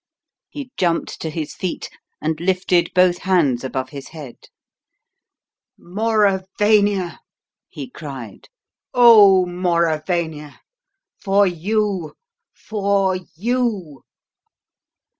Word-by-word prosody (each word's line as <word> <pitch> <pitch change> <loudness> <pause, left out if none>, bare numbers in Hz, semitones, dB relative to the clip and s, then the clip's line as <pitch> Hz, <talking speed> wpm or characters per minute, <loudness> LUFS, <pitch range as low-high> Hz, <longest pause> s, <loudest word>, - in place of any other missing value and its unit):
He 280 -3 -8
jumped 170 -2 -1
to 160 - -3
his 155 -1 -5
feet 185 -3 -4 0.3
and 155 0 -2
lifted 180 -1 +1
both 180 -1 +4
hands 160 -10 +1
above 130 0 -4
his 140 0 -9
head. 150 -7 -11 1.3
"Mauravania!" 205 -1 +1 0.5
he - - -8
cried. - - -10 0.5
"Oh, 210 -6 +7
Mauravania! 170 -3 -2 0.6
For 200 +1 +3
you! 190 -1 -2 0.4
For 200 -3 -1 0.2
you!" 210 - -2
185 Hz, 85 wpm, -20 LUFS, 160-205 Hz, 1.3 s, Oh